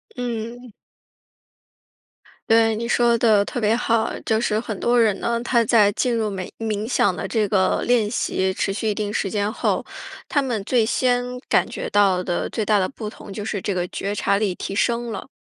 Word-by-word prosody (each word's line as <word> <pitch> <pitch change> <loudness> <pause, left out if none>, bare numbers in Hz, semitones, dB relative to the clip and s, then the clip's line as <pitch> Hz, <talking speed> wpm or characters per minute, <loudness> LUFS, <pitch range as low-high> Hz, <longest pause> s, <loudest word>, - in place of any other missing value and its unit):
嗯。 240 0 -5 1.8
对， 225 0 +4
你 230 +2 -3
说 240 -1 +3
得 220 -3 +4
特 245 - -4
别 220 0 +2
好。 230 -2 +1
就 220 -1 +1
是 215 -2 0
很 220 -3 -5
多 240 0 +3
人 215 -4 +2
呢， 235 0 -1
他 235 -1 +2
在 210 -2 +4
进 245 +2 0
入 220 -2 0
每 190 -2 -5
冥 215 -1 -2
想 210 -6 +2
的 - - -4
这 220 -3 0
个 190 -2 +2
练 235 -4 +3
习 190 -4 -1
持 195 - -1
续 215 +3 -3
一 - - +1
定 205 0 -3
时 195 -2 -2
间 205 0 0
后， - - -1 0.5
他 285 - +1
们 235 -6 -2
最 230 +2 +2
先 245 +1 +1 0.3
感 - - +3
觉 - - -5
到 195 -3 +3
的 175 -1 -2
最 220 - -1
大 210 0 +3
的 185 -2 +1
不 220 -6 -7
同 200 - -11
就 210 - -5
是 210 -1 -3
这 195 +2 -2
个 180 -1 -2
觉 200 +3 -4
察 200 -1 +1
力 200 -3 0
提 195 - -6
升 235 +2 0
了。 - - -6
220 Hz, 220 characters per minute, -22 LUFS, 205-235 Hz, 1.8 s, 对